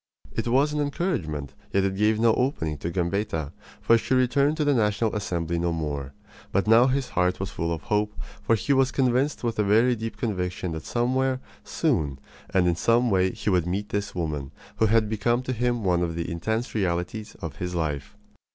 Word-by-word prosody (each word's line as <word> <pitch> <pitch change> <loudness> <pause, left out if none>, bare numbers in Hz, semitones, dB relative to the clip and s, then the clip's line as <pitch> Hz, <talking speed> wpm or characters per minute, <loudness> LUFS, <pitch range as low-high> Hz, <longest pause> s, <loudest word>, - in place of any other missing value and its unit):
It - - -2
was 140 +5 +3
an 150 - 0
encouragement, 90 - -2 0.2
yet 100 - +2
it 95 0 0
gave 105 +2 +2
no 115 -1 +5
opening 115 - 0
to 85 - -3
Gambetta 85 -3 -1 0.3
for 115 0 +4
she 130 - 0
returned 140 +4 +2
to 150 - +1
the 145 - +4
National 110 -1 +1
Assembly 85 -4 -2
no 85 0 0
more. 70 -4 -3 0.4
But 100 - +1
now 115 +3 +6
his 135 0 0
heart 90 0 +1
was 95 +1 -3
full 85 -4 -2
of 85 -1 -3
hope, 105 0 -1 0.2
for 115 - +3
he 140 +6 +1
was 135 -1 +3
convinced 130 +2 +1
with 115 -2 -1
a - - +4
very 115 +5 +4
deep 115 0 -5
conviction 90 -5 -2
that 80 -1 -6
somewhere, 130 +2 +1 0.2
soon, 70 -3 0 0.3
and 95 -2 +3
in 85 - +2
some 115 +6 +2
way 95 -1 +3
he 105 - -2
would 90 -2 +2
meet 100 +4 -2
this 100 0 -3
woman, 75 -5 -3 0.3
who 110 - +3
had 110 0 +3
become 120 +3 0
to 130 - -2
him 120 -1 0
one 90 -2 +2
of 85 -2 -1
the 85 0 -3
intense 110 +8 -2
realities 95 +2 -2
of 75 -4 -6
his 90 0 -4
life. 80 +4 -3
105 Hz, 200 wpm, -25 LUFS, 85-120 Hz, 0.4 s, now